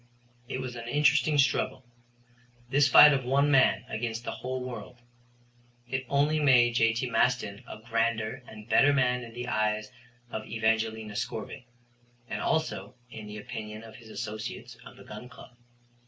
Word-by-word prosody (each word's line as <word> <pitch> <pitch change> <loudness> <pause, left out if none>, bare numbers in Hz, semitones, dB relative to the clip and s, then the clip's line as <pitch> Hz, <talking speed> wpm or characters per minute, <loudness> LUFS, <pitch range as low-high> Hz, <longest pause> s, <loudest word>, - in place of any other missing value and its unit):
It 130 - -4
was 125 -1 -6
an 115 0 -7
interesting 150 +3 +3
struggle 135 -2 +1 0.9
this 145 +1 +4
fight 150 +1 +9
of 135 -1 0
one 140 +3 +2
man 135 -3 +4
against 115 +1 -4
the - - -4
whole 130 +1 -4
world. 125 -1 -8 0.9
It 130 +1 -3
only 145 +2 +2
made 125 -5 +5
J.T. 115 +2 +2
Maston 115 -3 0
a - - -8
grander 115 +1 -1
and 105 -2 -12
better 135 +5 +5
man 125 -2 +1
in 115 -1 -10
the 120 0 -5
eyes 105 -1 -1 0.4
of 110 - -5
Evangelina 110 -1 -1
Scorbitt, 120 - -5 0.6
and - - -4
also 160 -5 -1 0.2
in 110 -1 -9
the 105 0 -8
opinion 105 +1 -7
of 110 -1 -12
his 115 -2 -15
associates 110 -1 -6
of - - -14
the - - -13
Gun 115 +4 -10
Club. 125 -2 -14
120 Hz, 155 wpm, -28 LUFS, 110-130 Hz, 0.9 s, fight